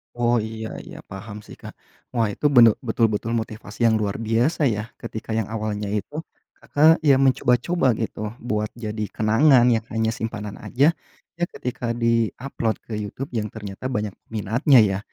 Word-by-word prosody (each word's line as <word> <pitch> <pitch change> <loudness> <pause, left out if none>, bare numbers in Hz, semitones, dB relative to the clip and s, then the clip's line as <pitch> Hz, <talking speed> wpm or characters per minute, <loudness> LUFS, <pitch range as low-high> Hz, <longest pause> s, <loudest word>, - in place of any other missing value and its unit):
Oh 120 0 +2
iya 110 0 -4 0.2
iya, - - -10
paham 100 +2 -8
sih - - -12
Kak. - - -9 0.4
Wah 115 -4 +1
itu - - -6
bene 120 -2 +9 0.2
betul-betul 115 -1 +1
motivasi 110 -2 -5
yang 110 - +3
luar 100 +1 -2
biasa 115 +8 +1
ya, 105 -1 -2 0.2
ketika 115 -1 -5
yang 110 -2 -1
awalnya 105 -2 -3
itu, 105 - -3 0.3
Kakak 160 +3 +3
ya 140 -4 +5
mencoba-coba 130 +1 +2
gitu, 110 -1 -3
buat 105 -3 -2
jadi 110 -2 -4
kenangan 120 +4 +4
yang 115 - +1
hanya 110 0 0
simpanan 105 -2 -5
aja, 145 +6 +3 0.5
eh, 175 - +1
ketika 120 -1 -3
di-upload 115 0 0
ke 115 - -7
YouTube, 105 +6 -5
yang 110 -3 -2
ternyata 105 +3 -6
banyak 105 -5 -2 0.2
peminatnya 115 - +3
ya. 95 -1 -1
115 Hz, 160 wpm, -23 LUFS, 105-125 Hz, 0.5 s, bene